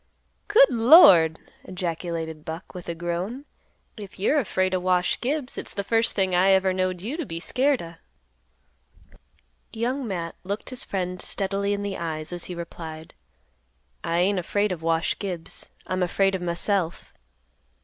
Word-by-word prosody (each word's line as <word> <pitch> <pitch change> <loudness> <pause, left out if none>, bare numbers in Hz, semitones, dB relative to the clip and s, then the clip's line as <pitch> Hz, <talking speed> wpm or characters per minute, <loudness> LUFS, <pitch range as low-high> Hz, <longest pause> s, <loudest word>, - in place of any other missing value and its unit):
"Good 460 +4 +6
Lord!" 225 - +7 0.3
ejaculated 165 -3 -4
Buck, 160 +3 -7
with 180 -2 -8
a 170 - -3
groan. 175 - -4 0.5
"If 200 -3 -10
you're 245 +10 +2
afraid 185 -5 0
o' 185 - +1
Wash 180 0 +1
Gibbs, 275 +1 -2
it's - - -7
th' 200 - -3
first 230 +1 +1
thing 190 -2 +1
I 180 +2 +4
ever 190 0 +3
knowed 185 -1 -1
you 255 +9 -4
t' 335 - -2
be 165 - -6
scared 260 +5 +1
o'." 165 0 -9 1.8
Young 245 +3 -2
Matt 170 -4 -4
looked 200 +6 -4
his 255 - -3
friend 180 -2 -3
steadily 200 +1 0
in 205 0 -1
the 200 -1 -3
eyes, 160 0 -4
as 175 - -2
he 180 - -6
replied; 160 -2 -8 0.9
"I 165 - -1
ain't 185 +2 +2
afraid 205 +3 0
of 175 -3 -4
Wash 165 0 0
Gibbs; 180 -5 -5 0.2
I'm 185 0 -2
afraid 195 +2 +2
of 190 - -2
myself. 175 0 -1
185 Hz, 160 wpm, -25 LUFS, 170-205 Hz, 1.8 s, Lord